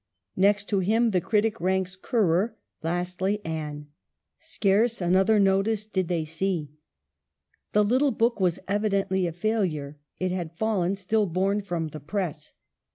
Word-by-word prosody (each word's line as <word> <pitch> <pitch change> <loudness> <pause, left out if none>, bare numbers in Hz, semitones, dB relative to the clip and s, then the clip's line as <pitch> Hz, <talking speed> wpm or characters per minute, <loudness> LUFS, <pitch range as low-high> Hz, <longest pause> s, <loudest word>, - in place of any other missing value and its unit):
Next 205 +2 +3
to 200 - +2
him 225 +5 +2
the 180 -3 +2
critic 220 +3 0
ranks 190 0 0
Currer, 210 0 +1 0.2
lastly 180 +4 -1
Anne. 150 -2 -4 0.5
Scarce 215 +4 +1
another 190 +4 +3
notice 200 +2 +2
did 190 -4 -1
they 165 -2 -1
see. 160 -1 -2 1.0
The 210 - +5
little 255 +7 +3
book 230 -1 +1
was 180 -2 +2
evidently 195 -2 +1
a - - -3
failure; 165 -7 -2 0.2
it 185 0 -1
had 170 -2 -4
fallen 200 -4 +1
still 205 +2 0
born 195 +4 0
from 175 -5 -3
the 155 - -8
press. 155 -3 -4
190 Hz, 140 wpm, -26 LUFS, 175-210 Hz, 1.0 s, The